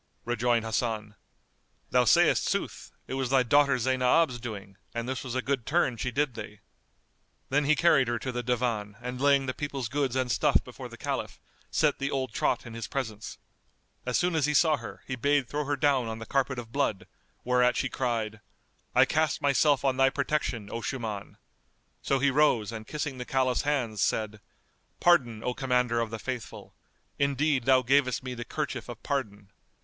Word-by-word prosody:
Rejoined 120 -1 +1
Hasan, 110 -2 -2 0.8
"Thou - - +4
sayst - - +4
sooth, - - -3
it - - -6
was 130 -2 -1
thy 130 -1 +4
daughter 140 +2 +4
Zaynab's 130 +2 +2
doing, 100 -4 -8 0.2
and 115 0 -3
this 130 0 -3
was 130 -2 -5
a 130 - -1
good 135 -3 -1
turn 145 -3 +1
she 120 +3 -2
did 140 +2 0
thee." 105 -2 -9 0.9
Then 145 +2 +2
he 155 +2 +4
carried 150 -6 +4
her 120 0 0
to 130 +2 -4
the 125 0 -3
Divan 115 -4 -1
and 125 +1 -6
laying 140 -1 +4
the 130 - -2
people's 135 -5 -4
goods 140 -2 -1
and 130 -2 0
stuff - - +3
before - - -9
the - - -11
Caliph, - - -4 0.3
set - - +1
the 140 0 -1
old 130 -5 -2
trot - - 0
in 120 - -9
his 115 -1 -5
presence. 110 -6 -5 0.7
As 125 -1 0
soon 180 0 +1
as 155 -3 +2
he 150 - 0
saw 155 +1 +4
her, - - -9
he 130 - -3
bade 140 +1 +1
throw 150 +2 -2
her 145 +1 0
down 135 -3 +2
on 110 0 -4
the 115 - -8
carpet 135 +1 0
of 115 -2 -7
blood, 135 -7 -1 0.4
whereat 125 0 +3
she 130 - 0
cried, 115 -5 -2 0.5
"I - - +7
cast 155 0 +1
myself 140 -1 +3
on 130 -1 +2
thy 135 0 +5
protection, 135 -6 -2
O 115 - -4
Shuman." 110 -4 -5 0.6
So 135 - +1
he 140 +1 +2
rose 130 -7 +3
and 110 -1 -7
kissing 145 -3 -4
the - - -3
Caliph's 130 -1 +1
hands, 125 -8 -1
said, 110 -1 -1 0.6
"Pardon, 125 -11 +3
O 125 - -1
Commander 125 -3 +1
of 115 -1 -1
the 115 - -5
Faithful! 125 +1 -6 0.5
Indeed, 140 -2 +1
thou 130 -1 +5
gavest 130 0 +2
me 130 -1 -5
the 120 -1 -5
kerchief 130 -3 -4
of 120 -1 -9
pardon." 105 -8 -3
125 Hz, 190 wpm, -28 LUFS, 115-140 Hz, 0.9 s, I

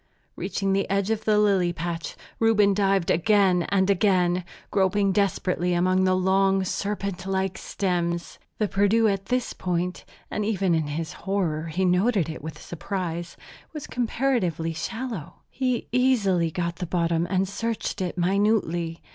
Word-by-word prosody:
Reaching 195 -1 -1
the 195 0 0
edge 200 +2 +1
of 220 -1 -2
the 215 -1 +3
lily 195 -4 +3
patch, 170 -1 -4 0.2
Reuben 210 -3 +4
dived 195 -2 +2
again 185 -1 +3
and 190 -1 +2
again, 185 -3 +2 0.3
groping 195 0 +2
desperately 185 -2 0
among 185 +2 +2
the 185 0 +3
long, 190 +1 +2
serpent 200 -1 -3
like 190 -1 -1
stems. 175 -3 -2 0.2
The 215 - +1
Perdu 205 +3 +3
at 195 -1 -1
this 250 0 -1
point 180 0 -2 0.3
and 210 - -1
even 195 -4 +1
in 160 -2 +1
his 160 +3 -4
horror 175 -6 -2
he 180 +4 -1
noted 185 0 +2
it 160 - -6
with 155 0 -7
surprise 175 -1 -5 0.4
was 300 -3 -6
comparatively 225 - -1
shallow. 225 - -5
He 255 -2 -1
easily 215 -10 +2
got 170 +1 -3
the 180 - -4
bottom 170 -1 0
and 190 0 +1
searched 220 0 -3
it 180 0 -3
minutely. 175 -3 +1
190 Hz, 145 wpm, -25 LUFS, 175-205 Hz, 0.4 s, Reuben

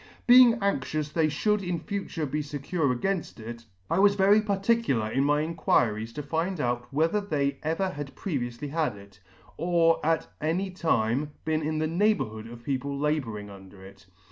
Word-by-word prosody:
Being 245 -1 +8
anxious 155 -4 -1
they 160 +1 +1
ihould 210 +8 0
in 180 -2 -2
future 180 -3 -4
be 150 +2 -2
fecure 145 +1 -1
againft 195 -7 -2
it, 115 +1 -8 0.2
I 170 - +1
was 200 0 +5
very 200 +2 +5
particular 200 - +1
in 135 +3 +1
my 145 +1 +2
inquiries 120 -9 0
to 150 - -5
find 165 +5 -2
out 120 -2 -2
whether 165 +9 +1
they 140 -8 -1
ever 165 +5 -1
had 145 -4 -7
previouily 135 -5 -4
had 155 -8 0
it, 100 -1 -16 0.4
or 165 0 +2
at 160 +1 +1 0.2
any 175 +5 -1
time 145 -5 0
been 155 0 0
in 155 +1 -2
the 155 - 0
neighbourhood 155 - 0
of 120 0 -11
people 140 +1 -2
labouring 130 -9 -2
under 95 0 -13
it. 95 -3 -15
150 Hz, 170 wpm, -27 LUFS, 120-180 Hz, 0.4 s, Being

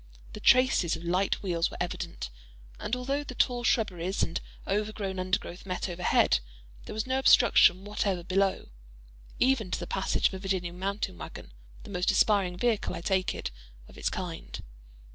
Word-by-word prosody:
The - - -7
traces 255 -10 +4
of 165 - -9
light 185 +4 0
wheels 170 -3 +1
were - - -9
evident; 170 - -4 0.5
and 235 - -1
although 270 +3 -2
the 255 -3 -8
tall 245 0 +1
shrubberies 195 -7 +1
and 165 - -2 0.3
overgrown 205 -1 -2
undergrowth 185 -1 -2
met 185 0 -3
overhead, 175 - +2 0.5
there - - -7
was 220 - -1
no 260 0 0
obstruction 200 -7 +6
whatever 200 -3 -1
below, 190 - 0 0.7
even 250 -6 +2
to - - -2
the 175 - -4
passage 190 +2 +1
of - - -12
a 190 - -5
Virginian 180 -2 -3
mountain 195 - -3
wagon—the - - -12
most 180 -1 0
aspiring 195 -4 +3
vehicle, 230 +1 0
I - - -5
take 185 +1 0
it, - - -4 0.4
of - - -16
its - - -1
kind. 175 -3 -6
190 Hz, 160 wpm, -29 LUFS, 175-215 Hz, 0.7 s, obstruction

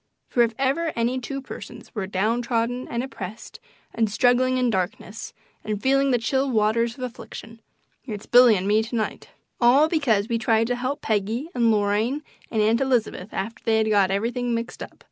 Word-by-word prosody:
For 245 - +2
if 230 -1 +2
ever 280 +5 0
any 240 +2 0
two 275 +2 -5
persons - - -10
were 200 -4 -3
"downtrodden 230 +5 -1
and 235 +1 -2
oppressed" 215 -5 -8 0.3
and 225 -2 +1
"struggling 250 +3 +3
in 250 -2 +2
darkness" 195 +3 -4 0.3
and 215 -1 -3
"feeling 275 +4 +2
the 250 - +3
chill 265 +4 0
waters 230 +1 +1
of 255 - -6
affliction," 230 -1 -8 0.5
it's 210 -3 -6
Billy 245 -2 +7
and 190 0 -2
me 210 +2 +4
to 225 +2 -5
night 220 -2 -3 0.3
all 260 +5 +5
because 245 - +1
we 230 -1 -1
tried 225 0 +2
to 245 +2 -1
help 260 +4 -3
Peggy 220 - -1
and 235 -2 +2
Lorraine 215 +7 +1 0.3
and 220 -2 +1
Aunt 225 +3 +2
Elizabeth 240 -7 0
after 220 +4 -5
they 225 -1 +2
had 220 0 +1
got 200 -3 +4
everything 235 +4 -1
mixed 230 +1 -5
up! - - -8
230 Hz, 185 wpm, -24 LUFS, 215-255 Hz, 0.5 s, Billy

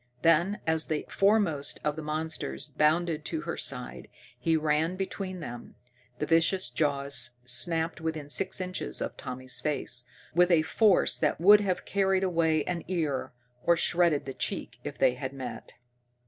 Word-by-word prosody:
Then, 170 +5 +3
as 160 -1 +1
the 155 -2 -2
foremost 195 -8 +2
of 150 -1 0
the 160 - -5
monsters 155 - -3
bounded 160 +1 +1
to 320 - -3
her - - -4
side, - - -5 0.3
he 165 -2 +2
ran 155 +3 +1
between 185 -1 -4
them. 120 -4 -8 0.4
The 150 - -2
vicious 165 -1 +2
jaws 140 -2 0
snapped 160 +6 +1
within 160 -3 -3
six 190 +7 -1
inches 185 0 -2
of - - -3
Tommy's 130 -1 -5
face, 130 -5 -1 0.3
with 180 +2 +4
a 165 -3 +4
force 200 +4 +3
that 150 -2 +1
would 205 +4 +7
have 190 -3 -1
carried 195 -1 +1
away 165 -4 +2
an 175 -2 -3
ear, 160 -7 -1 0.3
or 170 0 +4
shredded 170 -3 +2
the 135 - -5
cheek, - - -4
if - - -6
they 125 - +4
had 130 +1 -5
met. 130 -2 -7
160 Hz, 160 wpm, -28 LUFS, 145-180 Hz, 0.4 s, would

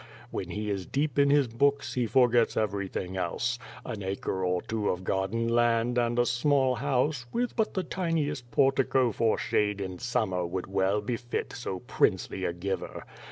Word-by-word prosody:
When - - -4
he 105 0 -3
is 95 -2 -3
deep 145 0 0
in 140 0 +5
his 145 -2 +4
l)ooks, 140 +4 +1
he 125 -2 0
forgets 120 -1 +4
everythin<r 100 -3 -2
else. 120 +7 -1 0.3
An 110 -4 -5
acre 95 0 -2
or 90 -1 0
two 110 -2 -1
of 90 0 -2
garden 95 +5 0
land, 120 +1 +2
and 120 0 0
a 120 - +4
small 130 +2 +2
house, 130 +1 0
with 245 +1 -1
but 220 -2 0
the 190 - 0
tiniest 155 -8 -2
portico 135 -2 +3
for 110 +1 +1
shade 105 -1 0
in 95 -2 -5
summer 110 -7 0
would 90 +1 -3
well 95 +2 +1
befit 120 +2 -3
so 95 -7 -5
princely - - 0
a - - 0
giver. 95 +3 -4
120 Hz, 170 wpm, -28 LUFS, 100-130 Hz, 0.3 s, in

